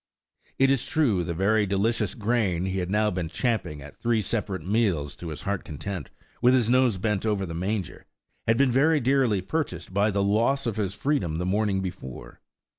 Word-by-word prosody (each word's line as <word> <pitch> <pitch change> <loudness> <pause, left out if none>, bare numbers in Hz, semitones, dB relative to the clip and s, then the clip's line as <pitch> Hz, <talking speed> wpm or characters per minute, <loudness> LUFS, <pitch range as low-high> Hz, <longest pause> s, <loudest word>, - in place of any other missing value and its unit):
It 135 0 +4
is 135 -3 +1
true 120 - +2
the 85 -1 -3
very 105 +3 +2
delicious 100 +1 0
grain 105 -6 0
he 95 0 -1
had 90 -1 -3
now 105 +1 +2
been 90 -3 -3
champing 85 - -2
at 75 - -13
three 120 -1 +1
separate 100 -5 -2
meals 95 -9 0
to 85 - -7
his 80 -2 -6
heart's 100 -1 -1
content, 85 0 -6 0.3
with 125 +1 +5
his 120 -2 +2
nose 125 -5 +3
bent 105 0 -1
over 105 -3 0
the 85 - -6
manger, 95 +3 -3 0.4
had 115 +1 +3
been 135 -1 +3
very 150 +5 +4
dearly 125 -6 +2
purchased 95 - -3
by 100 +2 +3
the 100 -1 0
loss 115 +8 +2
of 115 -3 -2
his 100 -3 -1
freedom 105 - 0
the 90 +2 -2
morning 100 0 +1
before. 75 -9 -8
105 Hz, 190 wpm, -26 LUFS, 90-115 Hz, 0.4 s, with